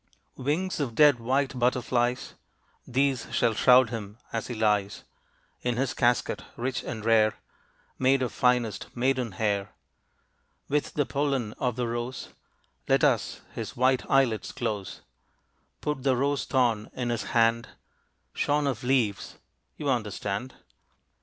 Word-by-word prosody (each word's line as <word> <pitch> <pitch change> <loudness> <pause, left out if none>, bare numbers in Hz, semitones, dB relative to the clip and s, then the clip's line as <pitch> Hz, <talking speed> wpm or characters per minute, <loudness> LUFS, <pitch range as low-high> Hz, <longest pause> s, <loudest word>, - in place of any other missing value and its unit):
Wings 160 +8 -1
of 125 -6 -2
dead 145 -4 +6
white 130 +2 0
butterflies, 125 0 0 0.5
These 135 0 +1
shall 115 - +2
shroud 125 +1 +5
him, 105 -2 -6 0.2
as 115 -1 -2
he 120 - -5
lies 105 -2 0 0.6
In 125 -1 -1
his 130 0 0
casket 120 -2 +1
rich 125 +2 -2
and 110 -4 -6
rare, 110 -2 +4 0.6
Made 130 0 +3
of 120 - -2
finest 125 -4 +1
maiden 125 -3 0
hair. 100 -1 -1 1.0
With 145 +1 -1
the 145 - +2
pollen 135 -7 -1
of 125 -3 0
the 120 -1 -1
rose 120 +2 -4 0.6
Let - - +3
us - - +1
his - - -6
white 130 0 +3
eye 135 0 +5
lids 110 -3 -4
close. 105 -5 -4 0.8
Put 150 -3 -2
the 130 -1 +2
rose 140 +2 0
thorn 120 -5 +1
in 120 -2 -2
his 115 - -2
hand, 115 0 +3 0.7
Shorn 145 0 +1
of 130 -5 -2
leaves 125 -6 0 0.4
you 150 - -4
understand. 110 -1 -2
125 Hz, 135 wpm, -27 LUFS, 115-135 Hz, 1.0 s, dead